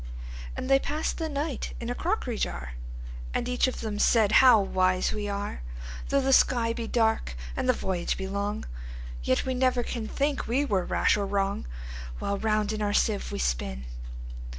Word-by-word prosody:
And 255 - -3
they 270 0 +6
pass'd 300 +3 -2
the 320 -1 -1
night 290 -1 -3
in 235 0 -3
a - - +1
crockery 270 - -1
jar; 65 -1 -2 0.6
And - - 0
each 250 +1 +2
of 255 - -3
them 210 -2 -3
said, 220 -3 +4
"How 250 -4 +8
wise 185 -1 +2
we 210 -1 -2
are! 200 - -3 0.5
Though 275 - +3
the 270 0 +3
sky 235 -3 +4
be 230 -1 -4
dark, 220 - +1 0.2
and - - -1
the - - +7
voyage 180 -2 -1
be 190 - -3
long, 200 +2 -2 0.6
Yet 130 - +1
we 260 - 0
never 255 -1 +2
can 230 -2 -3
think 285 +3 0
we 265 +5 +2
were 195 -9 +1
rash - - +3
or 200 -1 -1
wrong, 195 - 0 0.5
While 200 - -2
round 215 -1 +1
in 215 - -3
our 205 -1 +1
sieve 210 -1 +1
we - - -3
spin." 65 +1 -1
220 Hz, 185 wpm, -28 LUFS, 200-255 Hz, 0.6 s, How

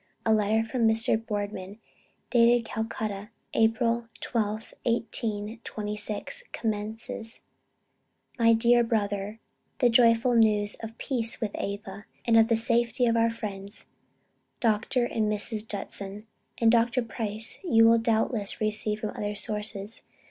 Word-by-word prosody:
A 220 - +4
letter 215 +1 +2
from 230 -1 +2
Mr. 225 0 +3
Boardman 205 -2 -4 0.5
dated 235 -1 +5
Calcutta, 215 -2 -4 0.2
April 230 +1 +2
12th, 215 -2 -2
1826, 220 - -2
commences: 220 +1 -4 1.0
"My 230 0 +6
dear 240 +1 +4
Brother, 210 -2 -1 0.4
The 245 - +4
joyful 230 +1 +5
news 210 -3 +3
of 225 0 -8
peace 230 -4 -1
with 220 -3 -2
Ava, 200 0 -5 0.2
and 230 - +3
of 225 0 +6
the 230 - +3
safety 235 +2 +1
of 230 -1 +2
our 230 0 +3
friends 205 -3 -5 0.7
Dr. 235 +2 +1
and 220 -3 0
Mrs. 215 +1 -2
Judson, 200 0 -6 0.3
and 230 -1 +4
Dr. 235 +1 +3
Price, 220 0 -4
you 225 -10 +5
will 230 0 +6
doubtless 225 -2 0
receive 215 0 -1
from 215 - -2
other 205 0 -4
sources. 210 0 -2
225 Hz, 125 wpm, -27 LUFS, 210-230 Hz, 1.0 s, My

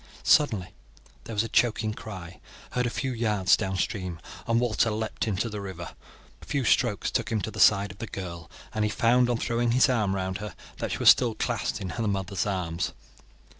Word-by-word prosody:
Suddenly 110 - +3 0.5
there 115 - -6
was 105 - +2
a - - -3
choking 110 -1 +1
cry 95 -6 -9 0.3
heard 125 -1 0
a - - 0
few 130 +2 -2
yards 105 -5 +3
down 95 0 -2
stream, 90 -5 -2 0.3
and 115 0 +3
Walter 115 -1 +2
leapt 110 +1 -2
into 105 +2 0
the 105 -2 -5
river. 90 -4 -6 0.5
A - - -12
few 140 -2 -1
strokes 115 - +2
took - - -1
him 110 - +1
to 110 - -4
the - - -8
side 100 -1 +5
of 95 - -15
the 115 - -5
girl, 85 -5 -7 0.2
and 110 - 0
he 105 - +1
found, 120 +3 +3
on 120 - +1
throwing 120 0 0
his 130 +2 +5
arm 105 -6 +1
round 95 0 -2
her, 105 -4 -7 0.2
that - - -3
she - - -2
was - - +6
still - - +5
clasped - - -2
in 95 - -4
her 115 +5 -2
mother's 95 -1 -1
arms. 90 -4 -2
105 Hz, 205 wpm, -27 LUFS, 95-115 Hz, 0.5 s, was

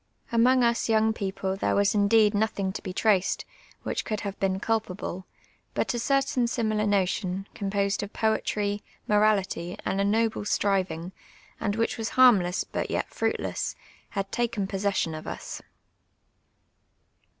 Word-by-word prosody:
Amonji: 250 +2 +5
us 235 0 +2
younp: 220 0 +3
people 190 -2 -3
there 195 - 0
was 200 0 +3
indeed 210 +1 +4
nothings 205 -2 0
to - - -5
be 190 - -5
traci'd, 195 -1 +1 0.4
which - - -2
could 215 -2 -3
have 200 -2 -5
been 190 -1 0
culj)able, 195 -4 -2 0.5
but - - 0
a 240 - -2
certain 270 -1 +1
similar 215 -3 0
notion, 195 -1 0
composed 200 0 -1
of 205 0 -5
poetry, 210 -2 0 0.3
morality, 200 -4 +1
and 195 - 0
a - - +2
noble 220 +2 +1
striving, 185 -4 0 0.5
and 205 -2 -1
which 230 +1 -1
was 225 - -1
harmless 205 -8 +5
but - - -4
yet - - -2
fruitless, - - -1 0.3
had 195 -1 -3
taken 235 -4 -1
possession 195 -4 -1
of 155 0 -7
us. - - -6
205 Hz, 140 wpm, -27 LUFS, 195-220 Hz, 0.5 s, Amonji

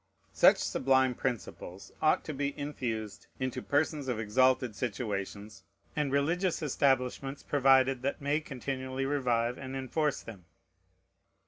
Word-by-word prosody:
Such - - +6
sublime 130 -1 +2
principles 100 -6 -5
ought 155 - +3
to 155 - -5
be 140 0 -2
infused 120 -8 -4
into 130 -2 -2
persons 145 -1 0
of 125 -4 -1
exalted 125 +1 +2
situations, 105 -3 -4 0.3
and 150 -3 0
religious 165 +5 +1
establishments 135 -1 0
provided 135 -2 +4
that 140 +2 -2
may 145 +2 +1
continually 130 -1 -4
revive 125 -4 0
and 130 0 -6
enforce 140 +3 -1
them. 100 -6 -11
130 Hz, 120 wpm, -30 LUFS, 120-140 Hz, 0.3 s, Such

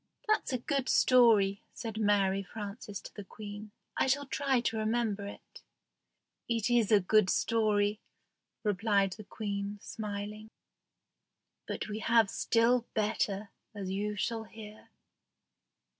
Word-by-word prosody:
"That's 430 -8 +1
a 255 - +1
good 270 +1 -1
story," 220 -6 +5
said 225 -2 -5
Mary 200 -2 +2
Frances 205 0 -7
to - - -11
the 205 - -8
Queen. 205 +1 -9 0.3
"I - - +2
shall 285 +2 +1
try 270 -1 +1
to 225 -1 -1
remember 215 -2 -1
it." 205 - -12 0.9
"It 230 0 0
is 235 -3 +3
a 210 - +7
good 200 +1 +3
story," 210 -2 +2 0.6
replied 200 -1 +2
the 215 - -10
Queen, 200 -1 -4
smiling; 210 +1 -6 1.2
"but - - -4
we 215 0 -4
have 225 -2 +3
still 235 +1 +2
better, 210 -1 -1 0.2
as 195 -2 -4
you 210 +2 -2
shall 225 +2 -2
hear." 215 -1 -12
215 Hz, 130 wpm, -31 LUFS, 205-230 Hz, 1.2 s, a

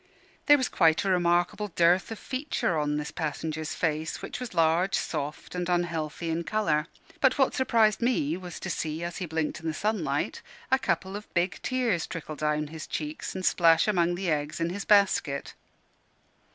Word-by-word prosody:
There 290 -1 +8
was 260 -2 0
quite 165 0 +3
a 195 - +2
remarkable 175 +3 +2
dearth 175 +1 +3
of 225 - -5
feature 255 - -2
on 150 -1 0
this 150 0 -4
passenger's 155 0 -3
face, 160 -1 -1
which - - -6
was 250 -7 -6
large, 165 +3 +3
soft, 150 -2 -4
and 180 0 -2
unhealthy 170 -2 -1
in 165 +1 -1
colour: 165 -6 0 0.3
but 265 0 +3
what 270 -2 +3
surprised 225 -4 +3
me 200 - +1
was 180 -1 -8
to 190 - -3
see, 160 0 -3
as 170 0 -4
he 180 - -4
blinked 160 0 -2
in 165 - -6
the 160 - -1
sunlight, 215 +4 -1 0.3
a 265 - +5
couple 190 -6 -1
of 210 +1 -8
big 175 +1 +1
tears 240 -9 0
trickle 155 -2 -6
down 150 0 0
his 160 -1 -8
cheeks 155 +3 -4
and 185 0 -3
splash 165 0 +4
among 175 -4 +2
the 180 -1 -1
eggs 150 +1 -2
in 165 +1 0
his 200 +2 -5
basket. 190 -9 +2
175 Hz, 180 wpm, -28 LUFS, 160-200 Hz, 0.3 s, There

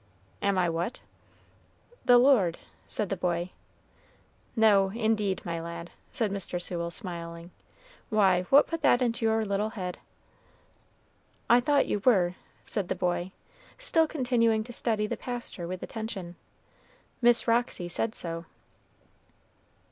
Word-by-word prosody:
"Am 200 -1 +1
I 180 -1 +3
what?" 170 +8 -3 1.0
"The 245 - +7
Lord," 240 -10 +4 0.3
said 210 -3 -2
the 195 - -1
boy. 175 0 -2 1.0
"No, 205 -4 +5
indeed, 215 -3 0
my 170 -1 -3
lad," 170 +1 -7 0.2
said 220 -4 -1
Mr. 195 -2 -3
Sewell, 170 -1 -2
smiling. 170 -3 -6 0.6
"Why, 195 -5 +4
what 280 +2 +7
put 330 -1 -4
that 255 -3 +4
into 230 -1 0
your 220 0 +1
little 200 +1 -1
head?" 185 -5 -5 1.5
"I 240 - +7
thought 285 +2 +2
you 210 - -1
were," 185 -8 +4 0.3
said 200 -5 -1
the - - -1
boy, 180 0 -1 0.5
still 330 -10 +2
continuing 235 -6 +1
to 240 +2 -10
study 220 -3 0
the - - -3
pastor 240 -8 -4
with 185 +1 -5
attention. 200 -6 -6 0.9
"Miss 240 0 +4
Roxy 230 -6 +1
said 220 +6 -1
so." 165 -1 -2
205 Hz, 130 wpm, -28 LUFS, 175-235 Hz, 1.5 s, The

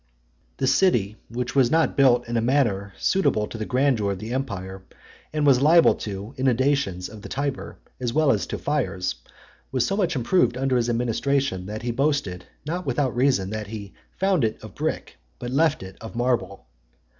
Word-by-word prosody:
XXIX. - - -41
The 135 - 0
city, 125 - +3
which 125 +2 -4
was 130 -3 +4
not 165 +3 +2
built 125 -3 +4
in 120 - -3
a 115 - +2
manner 115 -6 +1
suitable 190 - +1
to - - -10
the 110 -1 -4
grandeur 125 -6 +1
of - - -7
the 110 +5 -6
empire, 95 -8 -4 0.5
and 150 -1 0
was 135 -3 +5
liable 165 +3 +6
to 100 +3 -6
inundations 130 -7 +1
of 110 -1 -11
the 115 - -9
Tiber, 140 0 -3 0.2
as 125 -2 -1
well 155 +1 +3
as - - 0
to - - -4
fires, 120 -11 -1 0.6
was 130 -2 +1
so 195 - 0
much 185 -5 0
improved 125 -1 +2
under 135 0 +1
his 120 -1 +1
administration, 120 -3 0
that 110 +2 -6
he 120 - -1
boasted, 125 -9 -1 0.2
not 175 +4 -3
without 130 -1 0
reason, 120 -7 +2
that 110 -1 -4
he 100 -2 -8 0.2
"found 190 -6 +2
it 110 -1 0
of - - -10
brick, - - -3 0.2
but 120 0 -6
left 155 -3 +2
it 95 0 -10
of 115 +1 -8
marble." 120 -4 -1
125 Hz, 190 wpm, -24 LUFS, 105-140 Hz, 0.6 s, liable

